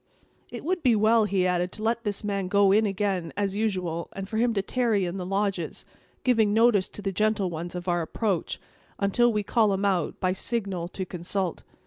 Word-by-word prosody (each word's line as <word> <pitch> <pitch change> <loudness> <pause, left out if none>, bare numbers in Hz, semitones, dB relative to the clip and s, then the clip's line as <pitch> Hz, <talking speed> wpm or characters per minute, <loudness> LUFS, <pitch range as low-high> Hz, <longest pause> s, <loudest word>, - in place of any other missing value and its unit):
"It - - -7
would 360 +1 0
be 250 -5 +4
well," 220 +1 +4
he 195 -3 +1
added, 180 0 0
"to 215 - -6
let 230 +1 0
this 205 0 -2
man 200 -2 -1
go 200 0 +4
in 215 +2 +4
again, 195 -4 -1
as 200 -1 -1
usual, 185 -6 -2
and 195 0 -6
for 220 - -3
him 235 +1 +3
to 195 - +1
tarry 225 -5 +1
in 175 +2 -4
the 180 -1 -4
lodges, 195 -4 -2 0.4
giving 220 -5 +3
notice 225 -4 +4
to 205 - -8
the 195 - -1
gentle 210 -1 +1
ones 170 +2 -5
of 180 0 -6
our 175 -1 +1
approach, 185 +2 -2 0.4
until 235 +5 +3
we 210 -2 0
call 215 0 +2
him 195 +1 -1
out, 190 -3 0
by 185 -1 +1
signal, 195 -4 -2
to 190 +1 -5
consult. 180 0 -3
200 Hz, 205 wpm, -26 LUFS, 185-215 Hz, 0.4 s, be